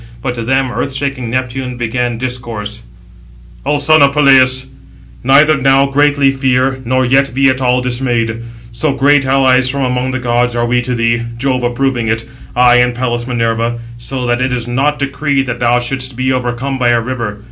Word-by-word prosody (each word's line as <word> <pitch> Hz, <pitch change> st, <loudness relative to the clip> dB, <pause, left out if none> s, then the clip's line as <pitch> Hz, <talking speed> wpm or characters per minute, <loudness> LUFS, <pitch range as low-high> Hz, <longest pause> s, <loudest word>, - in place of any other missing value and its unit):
But 125 Hz, -2 st, -2 dB
to 120 Hz, -, -5 dB
them 130 Hz, +2 st, 0 dB
earth 135 Hz, -, -3 dB
shaking 135 Hz, -3 st, -3 dB
Neptune 130 Hz, 0 st, -3 dB
began 120 Hz, 0 st, -2 dB
discourse: 115 Hz, -3 st, -5 dB, 0.9 s
"O 145 Hz, -, +2 dB
son 155 Hz, +2 st, +3 dB
of 140 Hz, 0 st, +4 dB
Peleus, 130 Hz, -2 st, +4 dB, 0.6 s
neither 145 Hz, +3 st, +4 dB
now 135 Hz, 0 st, +3 dB
greatly 140 Hz, 0 st, +2 dB
fear, 130 Hz, 0 st, 0 dB
nor 130 Hz, +1 st, 0 dB
yet 135 Hz, 0 st, +1 dB
be 135 Hz, 0 st, +4 dB
at 130 Hz, 0 st, -1 dB
all 125 Hz, 0 st, +2 dB
dismayed; 120 Hz, -3 st, -1 dB, 0.3 s
so 125 Hz, +5 st, -1 dB
great 140 Hz, 0 st, +2 dB
allies 130 Hz, -1 st, +3 dB
from 140 Hz, +1 st, -2 dB
among 125 Hz, 0 st, -1 dB
the 130 Hz, -, -2 dB
gods 120 Hz, -1 st, 0 dB
are 120 Hz, 0 st, 0 dB
we 120 Hz, +1 st, +1 dB
to 125 Hz, +1 st, -3 dB
thee, 115 Hz, 0 st, +1 dB, 0.2 s
Jove 130 Hz, 0 st, -1 dB
approving 120 Hz, -1 st, -1 dB
it, 110 Hz, +1 st, -1 dB, 0.3 s
I 125 Hz, 0 st, +5 dB
and 125 Hz, 0 st, +2 dB
Pallas 120 Hz, -1 st, -2 dB
Minerva, 115 Hz, -1 st, -1 dB, 0.2 s
so 125 Hz, +2 st, -4 dB
that 120 Hz, +1 st, 0 dB
it 130 Hz, 0 st, 0 dB
is 120 Hz, -1 st, -2 dB
not 135 Hz, +5 st, 0 dB
decreed 140 Hz, 0 st, -1 dB
that 125 Hz, -2 st, -4 dB
thou 120 Hz, 0 st, +2 dB
shouldst 130 Hz, +1 st, -2 dB
be 130 Hz, +1 st, 0 dB
overcome 130 Hz, +2 st, -3 dB
by 120 Hz, -1 st, +2 dB
a 120 Hz, 0 st, +3 dB
river. 115 Hz, -3 st, -4 dB
125 Hz, 185 wpm, -14 LUFS, 120-135 Hz, 0.9 s, I